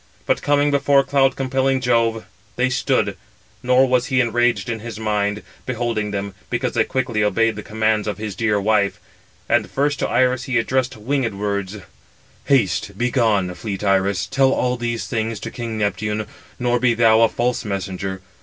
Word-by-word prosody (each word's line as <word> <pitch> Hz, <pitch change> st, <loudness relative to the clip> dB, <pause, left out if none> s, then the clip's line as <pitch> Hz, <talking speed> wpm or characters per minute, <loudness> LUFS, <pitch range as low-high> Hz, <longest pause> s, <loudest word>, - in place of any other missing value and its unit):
But -, -, +1 dB
coming 145 Hz, 0 st, +2 dB
before 140 Hz, -1 st, +3 dB
cloud 135 Hz, -1 st, +2 dB
compelling 135 Hz, 0 st, 0 dB
Jove, 115 Hz, -3 st, +1 dB, 0.3 s
they 130 Hz, +1 st, +1 dB
stood; 130 Hz, -, +1 dB, 0.5 s
nor 125 Hz, +1 st, +4 dB
was 125 Hz, -1 st, +1 dB
he 130 Hz, -2 st, +1 dB
enraged 120 Hz, 0 st, +1 dB
in 115 Hz, -2 st, -3 dB
his 110 Hz, -1 st, -7 dB
mind, 105 Hz, -1 st, -1 dB, 0.2 s
beholding 120 Hz, -4 st, -1 dB
them, 100 Hz, -1 st, -4 dB, 0.2 s
because -, -, -1 dB
they -, -, +3 dB
quickly 120 Hz, -5 st, -1 dB
obeyed 110 Hz, +2 st, +2 dB
the 105 Hz, -, -6 dB
commands 110 Hz, 0 st, 0 dB
of 105 Hz, -2 st, -2 dB
his 105 Hz, -1 st, -5 dB
dear 105 Hz, -1 st, +1 dB
wife. 100 Hz, -1 st, +1 dB, 0.5 s
And -, -, +1 dB
first 145 Hz, 0 st, 0 dB
to -, -, -1 dB
Iris 130 Hz, 0 st, +2 dB
he 125 Hz, -2 st, 0 dB
addressed 130 Hz, +2 st, 0 dB
winged 120 Hz, -1 st, -1 dB
words: 100 Hz, 0 st, -3 dB, 0.7 s
"Haste, 100 Hz, -6 st, +1 dB
begone, 110 Hz, -7 st, +1 dB
fleet 100 Hz, 0 st, -5 dB
Iris, 95 Hz, -1 st, +1 dB
tell 135 Hz, -1 st, +2 dB
all 125 Hz, -1 st, +1 dB
these 120 Hz, -1 st, -3 dB
things 115 Hz, -3 st, -2 dB
to -, -, -5 dB
king 115 Hz, -2 st, -5 dB
Neptune, 105 Hz, +1 st, -1 dB, 0.3 s
nor 120 Hz, 0 st, +1 dB
be 120 Hz, -1 st, +2 dB
thou 115 Hz, -1 st, +5 dB
a 115 Hz, -, +5 dB
false 120 Hz, +1 st, -1 dB
messenger. 95 Hz, -2 st, -4 dB
115 Hz, 170 wpm, -21 LUFS, 105-125 Hz, 0.7 s, thou